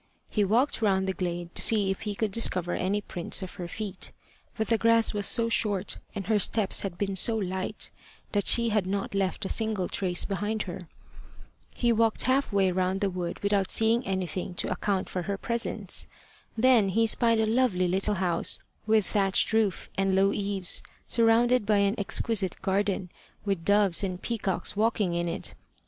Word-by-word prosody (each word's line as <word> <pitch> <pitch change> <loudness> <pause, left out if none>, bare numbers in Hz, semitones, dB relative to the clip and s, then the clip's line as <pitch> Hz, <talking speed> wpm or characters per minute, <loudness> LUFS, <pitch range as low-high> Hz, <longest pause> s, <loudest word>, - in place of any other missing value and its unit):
He 210 - +1
walked 230 +7 +1
round 190 -3 +2
the 190 - -1
glade 175 -2 -4
to - - +2
see 205 -4 +3
if 195 - -5
he 210 -2 -4
could 215 0 -2
discover 185 -5 +1
any 200 +3 -1
prints 180 0 -2
of 185 - -8
her 175 - -4
feet. 200 0 -6 0.5
But 220 -1 -2
the 230 - +3
grass 230 0 +3
was 205 -1 0
so 230 -1 +4
short, 205 -4 -1 0.2
and 200 -2 -4
her 215 -1 +2
steps 205 0 +1
had 190 -3 -5
been 195 0 -2
so 225 +4 +4
light, 190 -2 -4 0.4
that 205 -2 0
she 235 -1 +6
had 210 -4 0
not 195 +1 -3
left 195 +1 -2
a - - -1
single 215 -5 -1
trace 180 -3 -2
behind 210 +2 -2
her. 180 -1 -8 0.9
He 240 -1 +1
walked 225 0 +2
half 265 0 +1
way 195 -2 +2
round 185 +1 -1
the 200 -1 0
wood 175 0 -5
without 200 -2 +1
seeing 225 +2 +3
anything 185 -2 -4
to - - -2
account 190 +1 -1
for 180 - -4
her 195 +3 -3
presence. 235 +3 -4 0.5
Then 230 -4 +4
he 225 +4 +2
spied 230 0 +3
a 220 - +2
lovely 220 -6 +1
little 195 +3 +1
house, 180 -3 +1 0.3
with 215 -2 +3
thatched 195 +1 0
roof 220 -4 0
and 195 -1 +1
low 195 +1 +3
eaves, 200 -3 0 0.3
surrounded 235 +1 +3
by 210 0 +2
an 200 0 +2
exquisite 200 -1 +2
garden, 195 -2 -1 0.3
with 195 -5 -2
doves 200 -2 +4
and 185 -2 -3
peacocks 205 -6 -2
walking 210 -4 0
in 170 0 -1
it. 170 - -5
200 Hz, 185 wpm, -27 LUFS, 185-220 Hz, 0.9 s, she